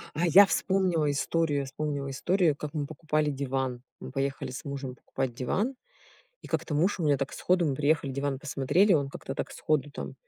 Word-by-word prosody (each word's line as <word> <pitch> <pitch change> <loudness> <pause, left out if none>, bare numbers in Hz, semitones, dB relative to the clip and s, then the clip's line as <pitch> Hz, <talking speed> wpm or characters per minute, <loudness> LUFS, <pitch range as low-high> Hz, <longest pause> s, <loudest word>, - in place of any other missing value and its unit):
А 175 +3 +1
я 195 +5 +9
вспомнила 185 -6 +1
историю, 145 +1 +1
я 140 - -2
вспомнила 140 0 -3
историю, 170 +3 +2
как 150 +1 -6
мы 145 -2 -1
покупали 155 0 -1
диван. 135 -3 -2 0.2
Мы - - -8
поехали 135 -1 -2
с 130 - -7
мужем 135 -2 -5
покупать 130 -2 -4
диван, 205 - -1 0.7
и - - -10
как-то 160 -1 -2
муж 180 +6 +2
у 165 - -1
меня 145 -1 +4
так 135 0 -3
сходу, 180 -1 +1
мы 140 - 0
приехали 145 0 +1
диван 140 0 -2
посмотрели, 150 +8 +2
он 140 -2 +1
как-то 135 0 -7
так - - -4
сходу 150 -1 0
там, - - -6
145 Hz, 195 wpm, -28 LUFS, 135-165 Hz, 0.7 s, я